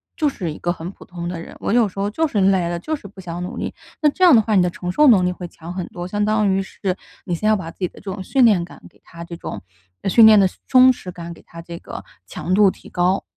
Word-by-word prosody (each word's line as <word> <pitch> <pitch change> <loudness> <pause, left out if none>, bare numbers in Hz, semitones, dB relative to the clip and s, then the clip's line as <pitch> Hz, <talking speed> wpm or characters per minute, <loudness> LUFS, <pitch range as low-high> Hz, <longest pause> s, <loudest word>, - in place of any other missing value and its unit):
就 305 - +1
是 180 - -4
一 150 - -8
个 175 - -1
很 165 +1 -7
普 - - -16
通 175 -1 -7
的 175 -1 -4
人， - - -11
我 - - -2
有 235 -3 +4
时 195 +1 -9
候 200 - 0
就 320 +10 0
是 220 -8 -1
累 190 -3 +3
了， 175 - -2
就 315 - -3
是 280 - -11
不 195 0 -16
想 175 -1 -6
努 180 - -6
力。” - - -4 0.3
那 300 - +5
这 370 +6 -2
样 340 -8 +8
的 220 - +6
话 215 0 0
你 185 - +5
的 180 - +2
承 180 +1 -5
受 300 +9 +4
能 200 -8 +6
力 180 - +1
会 180 -1 -7
强 170 +1 -10
很 185 -2 -4
多， 175 0 -7
相 205 +2 -1
当 215 -1 +2
于 190 0 +1
是， 190 -1 -4 0.3
你 175 - -2
先 215 +5 -2
要 215 - +5
把 175 -5 -5
自 - - -25
己 180 - 0
的 - - -16
这 195 - -6
种 190 -1 -6
训 260 +5 +3
练 200 -7 +4
感， 175 - -15
给 - - -28
他 170 0 -11
这 170 0 -8
种 - - -7 0.5
训 225 +4 +7
练 215 -1 +8
的 195 - +5 0.2
松 255 0 +7
弛 185 -7 -7
感， 170 -1 -8
给 - - -16
它 165 0 -11
这 170 0 -9
个 - - -9 0.2
强 185 - -4
度 200 -1 +5
提 - - -15
高。 180 +2 +1
190 Hz, 325 characters per minute, -20 LUFS, 175-215 Hz, 0.5 s, 样